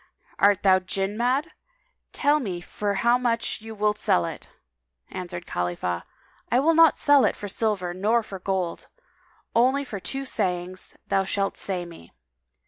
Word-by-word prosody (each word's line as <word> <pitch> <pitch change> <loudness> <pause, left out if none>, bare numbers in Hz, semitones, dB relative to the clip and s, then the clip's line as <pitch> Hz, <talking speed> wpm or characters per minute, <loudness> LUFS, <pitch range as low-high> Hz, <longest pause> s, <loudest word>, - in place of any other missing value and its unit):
Art 205 0 +4
thou 190 -1 +6
Jinn 195 +2 -2
mad? 255 +8 0 0.6
Tell 290 +1 +3
me 190 -10 -4
for 200 +3 -3
how 235 +5 +3
much 235 -2 -1
thou 220 0 -9
wilt 210 0 0
sell 85 - +2
it." - - -7 0.6
Answered 175 -2 -6
Khalifah, 90 0 -2 0.5
"I 245 - +4
will 320 +5 +4
not 330 -1 +6
sell 285 -2 +5
it - - +2
for 205 - -7
silver 195 -4 -1
nor 215 +6 +1
for 195 -3 -8
gold, 185 -2 -2 0.7
only 260 +4 +3
for 220 -7 -6
two 270 +8 -4
sayings 185 -5 -2
[FN#206] - - -42
thou 195 - +2
shalt 195 +1 -1
say 185 -3 -2
me." 165 - -13
200 Hz, 160 wpm, -25 LUFS, 185-235 Hz, 0.7 s, thou